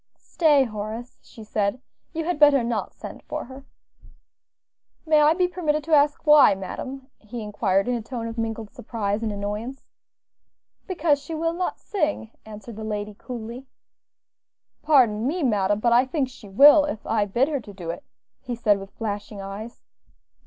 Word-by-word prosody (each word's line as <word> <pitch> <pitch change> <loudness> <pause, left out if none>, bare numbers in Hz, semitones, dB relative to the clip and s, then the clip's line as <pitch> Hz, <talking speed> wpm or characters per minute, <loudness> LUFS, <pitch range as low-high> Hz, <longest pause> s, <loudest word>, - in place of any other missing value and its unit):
"Stay, 300 -5 +3
Horace," 220 +1 -6
she 225 - -13
said; 210 +2 -1 0.3
"you 325 -1 -3
had 355 -2 -1
better 290 -4 +6
not 230 -2 -2
send - - -9
for - - -5
her." 265 +2 -12 1.4
"May 310 -1 +4
I 300 +2 +5
be 360 0 +2
permitted 310 -4 -1
to 320 +1 -2
ask 295 +1 +3
why, 300 -9 +7
madam?" 260 +8 -7
he 225 +1 -7
inquired 200 -1 0
in 250 - +1
a 240 - -2
tone 230 +1 -6
of 230 0 -5
mingled 225 -2 -4
surprise 210 -2 -3
and 225 -2 -2
annoyance. 210 +6 -5 1.0
"Because 335 -6 +1
she 320 +3 -6
will 330 +1 -1
not 360 +1 -2
sing," 300 - -2 0.2
answered 215 +1 -10
the 220 - -6
lady, 210 -1 -4
coolly. 240 +3 -8 1.1
"Pardon 240 -7 +3
me, 335 +3 -1
madam, 205 -4 +1
but 235 +2 +2
I 245 +2 +5
think 265 -1 -1
she 220 -5 -13
will, 290 +8 +7
if 220 -8 -5
I 215 -2 +1
bid 235 +7 +1
her 290 -3 -1
to 215 - -11
do 175 -4 -5
it," 285 - -9 0.4
he 245 - -4
said 210 -4 +2
with 195 0 -9
flashing 205 -1 -4
eyes. 200 +4 -8
235 Hz, 170 wpm, -24 LUFS, 210-290 Hz, 1.4 s, why